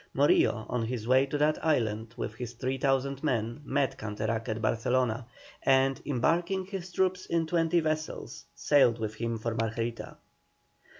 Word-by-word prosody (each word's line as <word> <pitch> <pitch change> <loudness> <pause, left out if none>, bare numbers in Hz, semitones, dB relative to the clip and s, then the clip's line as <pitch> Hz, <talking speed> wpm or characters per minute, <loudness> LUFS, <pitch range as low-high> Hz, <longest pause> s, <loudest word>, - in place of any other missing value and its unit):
Morillo 125 -5 +3
on 125 -2 -1
his 115 -1 -4
way 130 +2 +4
to 145 - -2
that 150 +1 +1
island 115 -6 0
with - - -3
his 120 +1 -6
3,000 135 +2 -1
men 120 -3 -1
met 140 -2 0
Canterac 110 +2 -3
at 110 +1 -2
Barcelona, 120 +1 0 0.3
and, 135 0 +3
embarking 170 +8 +1
his 190 -2 -6
troops 185 0 0
in 165 -1 +1
twenty 165 +1 +2
vessels, 155 0 -3
sailed 135 -6 +4
with 110 -2 -3
him 115 +1 -3
for 115 +1 -3
Margarita. 115 +1 -3
130 Hz, 145 wpm, -29 LUFS, 115-150 Hz, 0.3 s, way